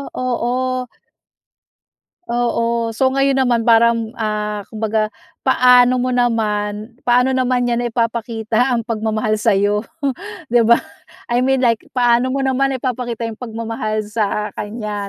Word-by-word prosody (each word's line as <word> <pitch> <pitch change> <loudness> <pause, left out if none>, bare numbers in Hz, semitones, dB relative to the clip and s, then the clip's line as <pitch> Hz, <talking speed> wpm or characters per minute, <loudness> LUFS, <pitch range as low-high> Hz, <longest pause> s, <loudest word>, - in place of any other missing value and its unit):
oo. 245 -1 -1 1.7
Oo, 235 -1 0
so 260 +4 +2
ngayon 275 0 +1
naman 240 -3 +2
parang, 230 -1 +3
ah, 210 -1 -2
kumbaga 220 -1 -1 0.3
paano 250 0 +5
mo 255 0 -1
naman 215 -2 -1
paano 250 +2 +3
naman 255 -1 +1
niya 240 0 0
naipapakita 230 +1 0
ang 230 - -3
pagmamahal 215 -1 -1
sayo, 205 -1 +2 0.7
'di 240 - +5
ba? 235 - +7 0.6
I 245 - +3
mean 265 0 +2
like 230 -2 +2 0.2
paano 245 +1 +3
mo 270 +1 -1
naman 265 0 +1
ipapakita 240 -2 -3
yung 225 0 -6
pagmamahal 225 -2 -3
sa 210 -1 -2
kanya, 210 -1 -5
235 Hz, 125 wpm, -18 LUFS, 215-250 Hz, 1.7 s, ba